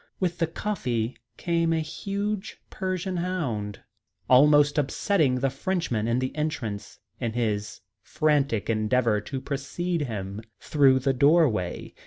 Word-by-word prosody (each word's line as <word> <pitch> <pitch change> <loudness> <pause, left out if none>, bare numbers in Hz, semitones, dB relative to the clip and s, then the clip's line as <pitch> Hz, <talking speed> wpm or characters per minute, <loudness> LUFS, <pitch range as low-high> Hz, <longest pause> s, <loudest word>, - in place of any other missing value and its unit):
With 175 -2 -1
the 165 - +2
coffee 125 - -2 0.2
came 170 -1 +1
a 165 - +2
huge 200 +6 -4
Persian 185 -1 -2
hound, 130 - -3 0.5
almost 145 +3 +5
upsetting 145 0 +1
the 135 -1 +1
Frenchman 135 - -1
in 115 +1 +1
the 130 +1 -2
entrance 140 -10 -3 0.2
in 115 -2 -2
his 105 -3 -2 0.2
frantic 140 -5 +1
endeavour 110 0 +1
to 135 +6 -5
precede 150 +6 -3
him 100 -2 -5 0.2
through 135 -3 +4
the 135 +1 +2
doorway. 135 - +2
140 Hz, 125 wpm, -26 LUFS, 115-170 Hz, 0.5 s, almost